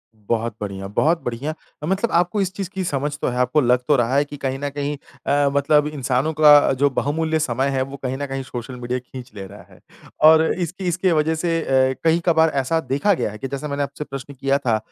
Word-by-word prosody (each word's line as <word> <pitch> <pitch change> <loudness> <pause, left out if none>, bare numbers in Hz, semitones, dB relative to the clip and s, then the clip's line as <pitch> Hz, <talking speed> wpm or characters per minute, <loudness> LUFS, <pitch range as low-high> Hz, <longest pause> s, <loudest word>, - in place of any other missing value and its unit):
बहुत 115 +1 -2
बढ़िया, 95 -1 -5
बहुत 160 - +1
बढ़िया। 125 +6 -3 0.3
मतलब 195 +6 0
आपको 180 +4 +2
इस 190 -1 -1
चीज़ 195 -3 -5
की 190 -1 -4
समझ 145 -1 -2
तो - - 0
है, 125 0 -2
आपको 125 +4 +2
लग 125 0 +3
तो 145 - +4
रहा 120 +1 +1
है 145 - +3
कि 145 0 -9
कहीं 135 -1 -3
न 145 - -2
कहीं 145 +1 -3 0.3
अ, 140 0 +3
मतलब 150 +1 +3
इंसानों 140 +1 -1
का 150 -2 +6
जो 145 0 +4
बहुमूल्य 160 +4 -1
समय 135 -2 0
है 135 -1 0
वो 135 +1 -5
कहीं 130 0 -2
न 145 - -3
कहीं 135 0 -4
सोशल 125 0 -7
मीडिया 125 +1 -2
खींच 125 0 -11
ले 100 -1 -7
रहा 100 +2 -13
है। - - -18 0.4
और 160 +1 +8
इसकी 180 +1 -4
इसकी 180 +2 +1
वज़ह 160 0 +2
से 165 0 0
अ, 130 -2 +2
कई 165 +1 +3
कभार 160 -2 +4
ऐसा 140 +3 0
देखा 145 +8 +1
गया 105 - -2
है 105 - -9
कि 135 - -5
जैसा 140 +3 -5
मैंने 140 0 -2
आपसे 145 - -5
प्रश्न 140 0 -8
किया 135 +1 0
था 120 -6 0
140 Hz, 235 wpm, -21 LUFS, 130-160 Hz, 0.4 s, और